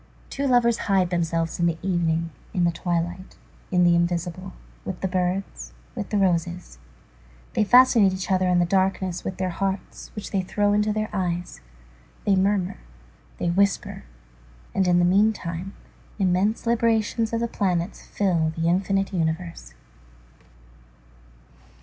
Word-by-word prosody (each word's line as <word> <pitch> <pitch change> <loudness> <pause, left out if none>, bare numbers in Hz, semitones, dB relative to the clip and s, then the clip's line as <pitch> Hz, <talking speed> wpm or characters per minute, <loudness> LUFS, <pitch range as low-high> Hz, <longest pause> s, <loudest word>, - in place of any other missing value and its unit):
Two 280 0 -1
lovers 240 -2 +3
hide 185 -2 +2
themselves 165 -1 -1
in 170 - +3
the 165 -1 -1
evening, 165 -3 0 0.2
in 180 - +2
the 170 - +3
twilight, 175 +1 -3 0.3
in 180 -1 +3
the 175 0 +5
invisible, 175 +2 -2 0.3
with 190 -2 -5
the 190 - 0
birds, 185 +1 -2 0.2
with 215 -5 -5
the 210 - 0
roses; 175 - -1 0.7
they 215 - +2
fascinate 235 -3 +6
each 185 +1 -4
other 185 0 +2
in 180 -1 +3
the 175 - +3
darkness 190 0 0
with 190 - -4
their 185 -1 -1
hearts 195 +2 -4
which 210 - -6
they 195 - +1
throw 205 +2 0
into 210 +1 +2
their 215 0 -1
eyes, 180 -3 -3 0.6
they 200 - +4
murmur, 190 -1 +1 0.6
they 170 - 0
whisper, 200 +2 0 0.7
and 190 -1 +1
in 175 -1 +4
the 175 - +4
meantime, 190 -2 +1 0.4
immense 195 +3 +1
librations 230 -1 +1
of 230 - 0
the 235 - 0
planets 180 -5 -1
fill 170 -5 0
the 165 0 0
infinite 195 +3 +1
universe. 165 - -3
185 Hz, 145 wpm, -24 LUFS, 175-200 Hz, 0.7 s, fascinate